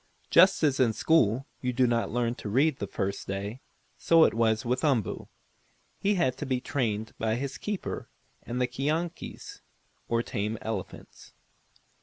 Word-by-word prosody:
Just 190 -2 +6
as 140 -3 +3
in 120 -4 +4
school 130 -3 +2 0.2
you 125 - 0
do 130 +1 +3
not 115 -1 +1
learn 120 0 0
to 110 - -7
read 135 +6 +2
the 100 - -3
first 100 +1 -3
day, 100 +6 -4 0.4
so 165 -1 +5
it - - +4
was 110 +1 +1
with 125 +4 -1
Umboo. 135 -9 0 0.7
He 205 +1 +2
had 170 -9 +1
to - - -4
be 130 -1 0
trained 110 -5 -2
by 110 0 +1
his 135 +2 -4
keeper 210 -2 -4 0.3
and 120 +1 -4
the 125 - +3
keonkies, 150 +7 -4 0.5
or 115 0 +1
tame 105 0 -3
elephants. 110 -4 -7
125 Hz, 160 wpm, -28 LUFS, 110-140 Hz, 0.7 s, Just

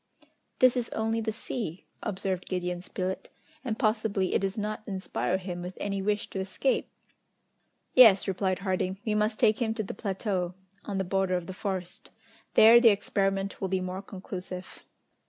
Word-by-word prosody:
"This 255 0 +5
is 245 -2 -1
only 225 +1 0
the 220 0 -1
sea," 215 -5 -5 0.2
observed 190 -2 -3
Gideon 180 -1 -2
Spilett, 185 +1 -4 0.3
"and 225 -4 -2
possibly 215 -3 +1
it - - +3
does 195 +2 -2
not 215 0 -2
inspire 190 -1 -1
him 180 -2 -5
with 180 +1 -7
any 200 -1 -2
wish 205 +1 0
to 195 - -3
escape!" 190 +8 0 1.0
"Yes," 220 -7 +8
replied 190 -1 0
Harding, 185 0 0
"we 215 - +1
must 215 +1 +1
take 215 +2 +3
him 225 -1 0
to 220 - -1
the 195 - -6
plateau, 190 -3 -2 0.3
on 200 -2 -3
the 190 - +1
border 190 0 +1
of 175 - -5
the 190 - -6
forest. 185 -2 -5 0.5
There 230 +2 +9
the 235 - +8
experiment 195 -1 0
will 190 - 0
be 190 0 0
more 185 +1 -4
conclusive." 185 -2 -8
195 Hz, 170 wpm, -28 LUFS, 185-215 Hz, 1.0 s, There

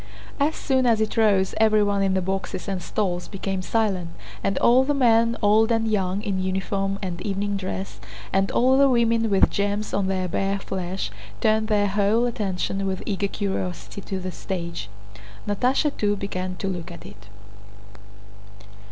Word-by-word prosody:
As 295 +3 +2
soon 260 -3 +1
as 230 -2 +3
it 220 -1 -1
rose 205 -4 +3
everyone 210 -2 +3
in 190 -1 +2
the 190 - 0
boxes 190 +1 -3
and 190 -2 -2
stalls 180 -2 -2
became 195 -1 -3
silent, 190 -4 0 0.3
and 195 - 0
all 250 +2 +5
the 290 +2 0
men, 230 -3 +3
old 215 +2 +4
and 225 -1 +1
young, 195 -2 0
in 195 -4 -1
uniform 195 +1 -1
and 180 -2 -4
evening 200 +1 -2
dress, 190 0 -5 0.3
and 195 +1 +2
all 260 +2 +4
the 275 0 +6
women 230 -2 +2
with 195 -2 +4
gems 205 +1 -1
on 200 -1 +1
their 185 -1 -1
bare 195 +3 -1
flesh, 185 - -4 0.3
turned 220 - +2
their 210 -2 +2
whole 205 +4 +2
attention 195 -3 -2
with 190 -1 -3
eager 200 -1 -1
curiosity 195 -1 -4
to 190 -1 -4
the 185 0 -4
stage. 170 - -5 0.6
Natásha 255 +8 +1
too 205 -1 +1
began 185 -2 -4
to 195 - -4
look 180 -2 -4
at 170 - -11
it. 105 +1 -13
200 Hz, 165 wpm, -24 LUFS, 190-220 Hz, 0.6 s, the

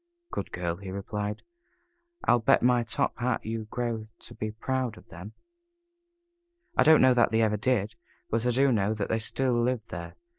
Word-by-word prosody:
"Good - - -4
girl," 85 -1 -3
he 95 0 -8
replied. 105 +2 -4 0.8
"I'll 120 - +4
bet 115 - +3
my 125 -1 +4
top 115 +1 -1
hat 125 0 -1
you 110 0 -3
grow 115 -1 -3
to - - -11
be 110 - -4
proud 120 +1 -2
of - - -17
them." 90 +6 -10 1.4
I - - +4
don't 155 -2 +7
know 130 -1 +6
that 120 -1 +4
they 115 0 +2
ever 105 -1 +2
did, 110 -2 0 0.3
but 115 +2 0
I - - +3
do 135 +3 +3
know 105 -1 +1
that 105 -2 -3
they 115 - +1
still 130 +3 0
live 120 -1 0
there. 85 -1 -7
110 Hz, 185 wpm, -28 LUFS, 105-125 Hz, 1.4 s, don't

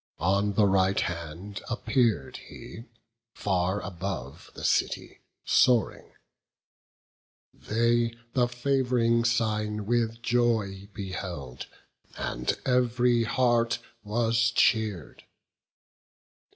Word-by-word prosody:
On 100 +3 +1
the 105 +1 +4
right 95 0 +3
hand 85 +4 -5
appear'd 120 -1 0
he, 115 - -11 0.5
far 95 0 0
above 90 -7 -6
The - - -9
city - - 0 0.3
soaring; 120 -4 +2 1.4
they 115 +1 +1 0.2
the 125 -2 +3
fav'ring 120 -2 +1
sign 105 -2 0
With 115 0 0
joy 110 -5 0
beheld, 90 - -6 0.5
and 60 +1 -2
ev'ry 125 -2 +2
heart 120 -1 +2 0.3
was 115 +1 +1
cheer'd. 110 - +1
110 Hz, 85 wpm, -27 LUFS, 95-120 Hz, 1.4 s, the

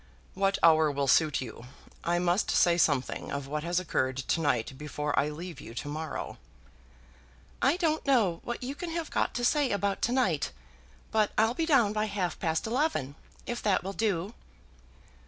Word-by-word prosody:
"What 195 0 +1
hour 160 -2 +6
will 140 -1 -1
suit 150 +2 +3
you? 125 -2 -8 0.4
I 170 +1 +1
must 175 +3 +1
say 175 -1 +4
something 145 -6 0
of 140 -1 -3
what 150 +2 -3
has 175 +1 +1
occurred 130 -7 -1
to 135 +5 -1
night 135 -4 0
before 150 +1 -4
I 145 +2 +1
leave 170 +3 -7
you 115 - -10
to 145 - -5
morrow." 155 +2 -5 1.2
"I 280 +6 +3
don't 320 -4 0
know 220 -12 +2
what 240 +1 -5
you 260 +3 -3
can 340 +4 -6
have 330 -1 -4
got - - 0
to 240 - 0
say 290 +1 +3
about 200 -2 -1
to 235 - +1
night, 200 - +1 0.6
but 215 -2 +3
I'll 225 +2 +4
be 320 +5 -1
down 240 -10 +4
by 215 0 0
half 200 -4 -2
past 160 -1 -1
eleven, 230 - 0 0.3
if 240 0 -4
that 200 -4 +1
will 195 +2 -4
do?" 200 -2 -1
180 Hz, 180 wpm, -29 LUFS, 150-235 Hz, 1.2 s, hour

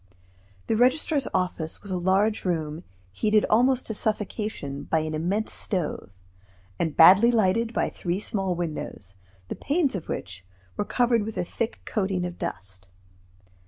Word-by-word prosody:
The 225 - 0
registrar's 265 +4 +2
office 175 -3 -2
was 200 - -7
a - - 0
large 195 +4 +2
room 160 -2 -2 0.3
heated 215 - +2
almost 250 +3 +3
to 220 - -3
suffocation 210 -9 -3
by 160 - +1
an 155 0 -4
immense 180 +8 -1
stove, 180 - -1 0.7
and 160 -3 -1
badly 195 +8 +8
lighted 225 0 +2
by - - -1
three 175 +1 -3
small 195 -4 -2
windows, 155 - -5 0.3
the - - -5
panes 290 -1 0
of 190 -5 -5
which 95 -2 -5 0.3
were 205 - -2
covered 240 -1 +2
with 220 +1 -6
a - - -1
thick 230 +5 -4
coating 190 -4 -1
of 175 0 -7
dust. 95 -1 -6
190 Hz, 150 wpm, -25 LUFS, 165-220 Hz, 0.7 s, badly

